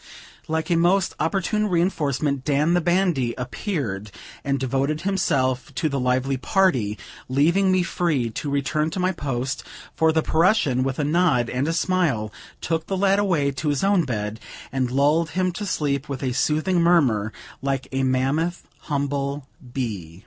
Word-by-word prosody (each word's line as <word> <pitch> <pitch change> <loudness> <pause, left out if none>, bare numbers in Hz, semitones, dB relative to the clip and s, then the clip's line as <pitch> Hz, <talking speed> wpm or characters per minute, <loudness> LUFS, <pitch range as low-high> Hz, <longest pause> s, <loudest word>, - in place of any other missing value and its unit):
Like 160 +1 -2
a - - +4
most 175 +3 +2
opportune 200 +5 0
reinforcement, 150 -6 0
Dan, 150 +3 +2
the 175 - +3
bandy, 175 -8 +1
appeared, 125 - -3 0.3
and 140 0 0
devoted 135 +4 -1
himself 140 -9 0
to 155 +4 0
the 140 -1 -2
lively 130 +2 +1
party, 125 - +1 0.3
leaving 170 +9 +3
me 185 -1 +3
free 155 -9 0
to 145 +6 -4
return 140 +2 0
to 175 - -5
my 185 +1 +2
post; 135 -5 -3 0.3
for 160 0 +3
the 160 0 +1
Prussian, 160 - +2
with 130 0 -1
a 150 - 0
nod 145 -6 +2
and 130 +4 -1
a - - +1
smile, 165 - 0 0.3
took 160 0 -2
the 195 - -1
lad 195 +1 +3
away 165 -9 +1
to 150 +3 -2
his 145 +2 0
own 195 -3 +3
bed, 105 -3 -3 0.3
and 130 -2 0
lulled 145 +5 +2
him 185 -1 +2
to 205 +3 -5
sleep 145 -4 -1
with 140 -1 -4
a 130 -2 0
soothing 155 +7 +1
murmur, 130 -12 +3 0.3
like 135 -1 -2
a 135 0 -1
mammoth 135 +7 0 0.2
humble 140 -1 -2 0.3
bee. 100 -11 -4
145 Hz, 165 wpm, -23 LUFS, 130-175 Hz, 0.3 s, a